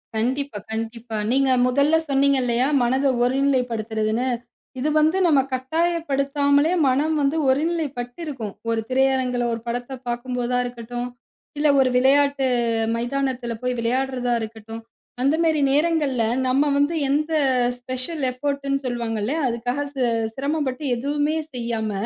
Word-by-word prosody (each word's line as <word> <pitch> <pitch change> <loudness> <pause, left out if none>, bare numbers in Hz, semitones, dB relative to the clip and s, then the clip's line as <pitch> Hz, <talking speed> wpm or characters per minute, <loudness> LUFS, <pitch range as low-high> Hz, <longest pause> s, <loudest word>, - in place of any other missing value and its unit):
கண்டிப்பா 260 +2 -1
கண்டிப்பா. 225 0 -4
நீங்க 270 +1 +3 0.2
முதல்ல 280 +5 +3
சொன்னீங்க 275 0 +3
இல்லையா, 245 +1 +2 0.2
மனத 260 +3 +1 0.2
ஒருநிலைபடுத்துறதுன்னு, 245 -3 0 0.5
இது 290 +4 0
வந்து 315 +4 +3
நம்ம 295 -4 +4
கட்டாயப்படுத்தாமலே 285 0 +1 0.2
மனம் 295 +5 +1
வந்து 285 +3 +1
ஒருநிலைபட்டிருக்கும். 275 - -2 0.2
ஒரு 225 -1 0
திரையரங்குல 260 -1 +1
ஒரு 230 - -4
படத்த 245 +2 -4
பாக்கும்போதா 245 0 -2
இருக்கட்டும், 245 0 -5 0.5
இல்ல 300 +1 +2
ஒரு 260 -1 +4
விளையாட்டு 275 +1 +3 0.5
மைதானத்துல 245 0 -2
போய் 250 0 -1
விளையாடுறதா 250 +1 0
இருக்கட்டும், 225 0 -8 0.4
அந்த 275 +4 +3
மாரி 315 -3 +2
நேரங்கள்ல 290 -5 +2 0.2
நம்ம 265 +3 +3
வந்து 290 +4 +2
எந்த 305 +3 0 0.5
ஸ்பெஷல் 255 +5 -4
எஃபர்ட் 280 +2 -3
-னு 275 - +2
சொல்வாங்கள்ல, 235 -1 -2
அதுக்காக 245 +3 -2
சி 265 - 0 0.3
சிரமப்பட்டு 280 -1 -2
எதுவுமே 290 +5 -1 0.2
செய்யாம, 230 -3 -2
260 Hz, 115 wpm, -22 LUFS, 240-285 Hz, 0.5 s, நம்ம